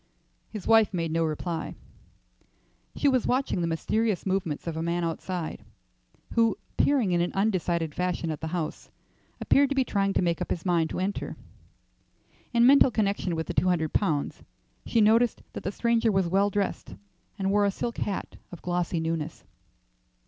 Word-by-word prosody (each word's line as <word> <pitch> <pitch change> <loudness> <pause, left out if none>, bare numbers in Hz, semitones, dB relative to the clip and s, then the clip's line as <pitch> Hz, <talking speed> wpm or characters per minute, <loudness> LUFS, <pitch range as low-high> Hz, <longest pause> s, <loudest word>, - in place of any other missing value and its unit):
His 215 -4 -7
wife 225 -3 +4
made 165 -2 -1
no 165 +1 +1
reply. 160 +2 -3 1.2
She 290 - +1
was 260 -3 +2
watching 255 -7 0
the 170 - 0
mysterious 210 +5 0
movements 185 -6 -1
of 165 -2 -3
a 160 - -3
man 170 +1 -1
outside, 170 0 -4 0.7
who, 230 -1 +3 0.2
peering 260 -9 +2
in 175 -1 +2
an 175 - 0
undecided 175 -6 0
fashion 180 -2 -1
at 155 - -6
the 160 - -3
house, 165 -1 -4 0.5
appeared 280 0 +3
to 280 - -1
be 265 - +3
trying 195 -4 0
to - - +1
make 170 -1 0
up - - -3
his 170 - -3
mind 170 -3 +2
to - - -4
enter. 195 +2 -3 1.1
In 235 -1 +4
mental 275 +1 +7
connection 200 -6 0
with 160 0 -2
the - - -4
two 185 - +2
hundred 160 -4 +1
pounds, 155 -8 0 0.5
she 230 - +3
noticed 225 +2 +3
that - - -5
the 195 - -2
stranger 235 +1 +2
was 190 -3 +1
well 195 +3 +2
dressed, 200 - -3 0.4
and 195 -1 0
wore 205 0 +3
a - - +3
silk 235 +4 -4
hat 200 - -3
of 175 - -10
glossy 175 -1 -1
newness. 160 -1 -3
185 Hz, 175 wpm, -27 LUFS, 165-220 Hz, 1.2 s, mental